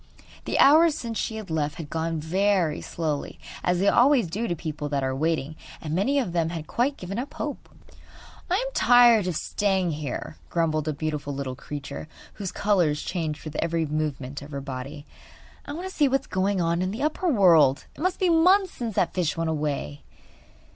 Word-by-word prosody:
The - - -1
hours 315 +2 +6
since 230 -5 -4
she 220 - -2
had 215 -6 -7
left 150 -2 -1
had 165 -4 -7
gone 165 0 -2
very 180 0 +1
slowly 155 -4 -3 0.3
as 180 0 +2
they 195 +3 +1
always 255 +2 +5
do 210 +8 -3
to 175 - -1
people 155 -2 -5
that 140 -2 -1
are 130 0 -1
waiting 155 0 -1 0.2
and 155 -1 -5
many 205 - +1
of 235 -11 -1
them 165 -2 +1
had 165 -2 -5
quite 260 - 0
given 195 +4 -5
up 275 +3 -6
hope. 295 -2 -5 0.8
'I 355 - +2
am - - -2
tired 240 - +6
of 180 - -2
staying 190 -1 0
here,' 150 -1 -5
grumbled 155 -2 0
a 155 - 0
beautiful 145 -1 -3
little 135 -2 -4
creature, 145 +2 -7 0.3
whose 195 -3 -5
colours 175 -8 +1
changed 160 -4 -3
with 155 - -7
every 165 0 0
movement 145 -3 -3
of 140 - -10
her 140 -2 -5
body, 140 +2 -7 0.6
'I 285 - -5
want 350 +5 -5
to 375 - -8
see 295 - +3
what 270 0 +1
is - - -19
going 195 -2 0
on 170 0 +1
in 185 - 0
the 225 +8 -4
upper 310 +4 0
world. 170 - +5
It - - -11
must 370 +2 0
be 370 - +2
months 365 +3 +4
since 230 -4 -5
that - - +1
fish 175 -3 -1
went 165 -1 0
away. 145 - -3
170 Hz, 200 wpm, -25 LUFS, 150-230 Hz, 0.8 s, hours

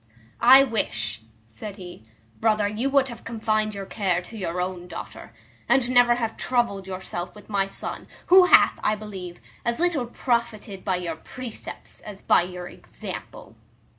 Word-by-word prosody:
"I 265 +1 +10
wish," 115 - -2 0.2
said 150 - -9
he, 180 - -10 0.4
"brother, 215 -2 +2
you 220 +6 -1
would 275 -1 +3
have 235 -2 -9
confined 215 -2 -1
your 195 -1 -5
care 190 -3 0
to 225 - -11
your 180 -4 -3
own 180 -1 -3
daughter, - - -8 0.4
and 265 -3 +4
never 245 -1 +6
have 225 -2 -3
troubled 235 -6 0
yourself 185 -1 -5
with 210 0 -14
my 195 -1 +1
son, 195 - -6 0.2
who 370 +1 +8
hath, - - +6
I 215 - +2
believe, 190 -5 -8 0.2
as 235 -1 0
little 330 -8 +1
profited 235 -5 -2
by 190 -2 +1
your 170 -3 -4
precepts, 245 +6 -9
as 205 -2 -10
by - - +4
your 180 0 -6
example." - - -9
210 Hz, 160 wpm, -25 LUFS, 185-235 Hz, 0.4 s, I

